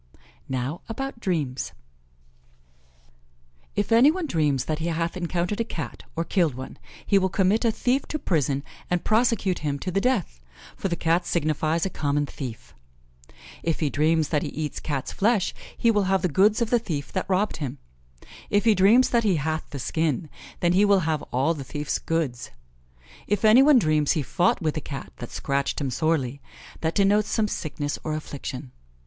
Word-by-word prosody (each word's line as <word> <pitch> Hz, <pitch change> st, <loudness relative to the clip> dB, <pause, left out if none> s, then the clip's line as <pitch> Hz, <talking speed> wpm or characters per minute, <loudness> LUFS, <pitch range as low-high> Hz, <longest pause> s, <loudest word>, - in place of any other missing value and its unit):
Now 130 Hz, +5 st, -3 dB
about 270 Hz, +1 st, -4 dB
dreams: 150 Hz, -, -2 dB, 2.0 s
If 205 Hz, +2 st, -1 dB
any 235 Hz, +5 st, +7 dB
one 355 Hz, +2 st, -1 dB
dreams 150 Hz, -, +1 dB
that 155 Hz, 0 st, -2 dB
he 165 Hz, -, -2 dB
hath 165 Hz, +1 st, -1 dB
encountered 180 Hz, +3 st, -1 dB
a -, -, +2 dB
Cat, 165 Hz, -8 st, -6 dB
or 165 Hz, -, 0 dB
killed 165 Hz, -, +1 dB
one, 130 Hz, +1 st, -8 dB, 0.3 s
he 200 Hz, -, +4 dB
will 190 Hz, 0 st, +1 dB
commit 195 Hz, +5 st, +2 dB
a 230 Hz, -, +3 dB
thief 255 Hz, +5 st, 0 dB
to 305 Hz, -, -2 dB
prison 145 Hz, -, 0 dB, 0.3 s
and 180 Hz, -1 st, 0 dB
prosecute 220 Hz, -4 st, +2 dB
him 145 Hz, -2 st, -2 dB
to 185 Hz, +6 st, -4 dB
the 195 Hz, +2 st, +1 dB
death, 200 Hz, -, 0 dB, 0.3 s
for -, -, -2 dB
the 175 Hz, -, -1 dB
Cat 170 Hz, +1 st, +1 dB
signifies 155 Hz, +1 st, 0 dB
a 190 Hz, -, -2 dB
common 145 Hz, -1 st, 0 dB
thief. 125 Hz, -5 st, -8 dB, 0.9 s
If 165 Hz, -1 st, -1 dB
he 150 Hz, -3 st, 0 dB
dreams 155 Hz, +1 st, +2 dB
that 150 Hz, -3 st, +1 dB
he 150 Hz, -, -3 dB
eats 150 Hz, +1 st, -4 dB
Cat's 140 Hz, -4 st, -3 dB
flesh, 210 Hz, -2 st, +1 dB, 0.2 s
he 230 Hz, -, +4 dB
will 205 Hz, -3 st, +2 dB
have 190 Hz, 0 st, +1 dB
the -, -, +3 dB
goods 210 Hz, -, +3 dB
of 230 Hz, -, -4 dB
the 240 Hz, -, +4 dB
thief 150 Hz, -, -4 dB
that 185 Hz, -, -2 dB
robbed 195 Hz, +3 st, +1 dB
him; 145 Hz, -3 st, -4 dB, 0.7 s
if 205 Hz, +2 st, +2 dB
he 225 Hz, -, +6 dB
dreams 210 Hz, +7 st, +5 dB
that 235 Hz, -1 st, +3 dB
he 200 Hz, -4 st, +3 dB
hath 155 Hz, +1 st, -2 dB
the 145 Hz, -, -6 dB
skin, 155 Hz, +2 st, -1 dB, 0.3 s
then 175 Hz, 0 st, +3 dB
he 195 Hz, +3 st, +5 dB
will 200 Hz, -2 st, +4 dB
have 155 Hz, -2 st, 0 dB
all 135 Hz, +6 st, +2 dB
the 145 Hz, -4 st, -6 dB
thief's 145 Hz, +2 st, -3 dB
goods. 155 Hz, -7 st, -2 dB, 0.8 s
If 205 Hz, +1 st, +1 dB
any 220 Hz, +4 st, +8 dB
one 285 Hz, 0 st, +7 dB
dreams 155 Hz, -, +3 dB
he 155 Hz, -, -1 dB
fought 180 Hz, +6 st, +1 dB
with 155 Hz, -2 st, 0 dB
a -, -, -2 dB
Cat 140 Hz, -2 st, -7 dB
that 120 Hz, -, -7 dB
scratched 140 Hz, 0 st, -1 dB
him 140 Hz, -3 st, -2 dB
sorely, 140 Hz, -2 st, 0 dB, 0.4 s
that 160 Hz, 0 st, -1 dB
denotes 205 Hz, +1 st, +3 dB
some 220 Hz, -2 st, +1 dB
sickness 150 Hz, -6 st, -3 dB
or 155 Hz, -1 st, -2 dB
affliction. 140 Hz, -3 st, -6 dB
165 Hz, 185 wpm, -25 LUFS, 145-205 Hz, 2.0 s, any